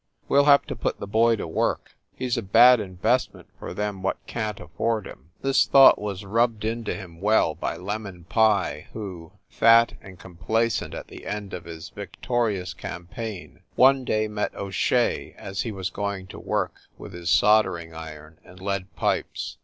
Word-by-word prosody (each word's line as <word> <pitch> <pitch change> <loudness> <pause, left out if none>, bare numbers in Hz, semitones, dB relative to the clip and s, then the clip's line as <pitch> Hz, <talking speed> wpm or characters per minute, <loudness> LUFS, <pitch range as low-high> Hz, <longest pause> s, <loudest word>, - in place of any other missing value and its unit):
We 140 - +4
ll 140 - +5
have 140 -1 +6
to - - -5
put - - -3
the - - -5
boy 115 +3 +3
to 105 - -5
work; 80 - -1 0.2
he 130 - -4
s 125 - 0
a 120 - -1
bad 115 +5 +6
investment 105 +5 -1
for - - -7
them 100 +1 -3
what 95 - -1
can 110 -2 -3
t - - -10
afford 105 +7 -2
him." 70 -2 -12
This 135 0 +3
thought 135 -1 +7
was 100 -1 -5
rubbed 115 +1 +1
into 115 0 -2
him 90 -4 -10
well 105 -6 +3
by - - -4
"Lem 105 +3 -4
on" 90 -2 -11
Pye 100 -6 +1
who, 90 -7 -8
fat 115 0 +5
and 95 -2 -12
complacent 95 +6 -2
at - - -7
the - - -11
end 105 -1 -5
of 90 -2 -6
his 85 +1 -8
victorious 100 -2 -2
campaign, 95 +4 -7
one 135 0 +5
day 110 -3 0
met 105 -1 -3
O 100 -1 -5
Shea - - 0
as 95 0 -4
he 115 - -3
was 95 -1 -4
going 100 -2 -3
to - - -9
work - - -1 0.2
with - - -10
his 85 0 -5
soldering 95 -7 +3
iron 80 -1 -10
and 90 - -15
lead 100 -1 -3
pipes. - - -2
100 Hz, 185 wpm, -25 LUFS, 90-115 Hz, 0.2 s, thought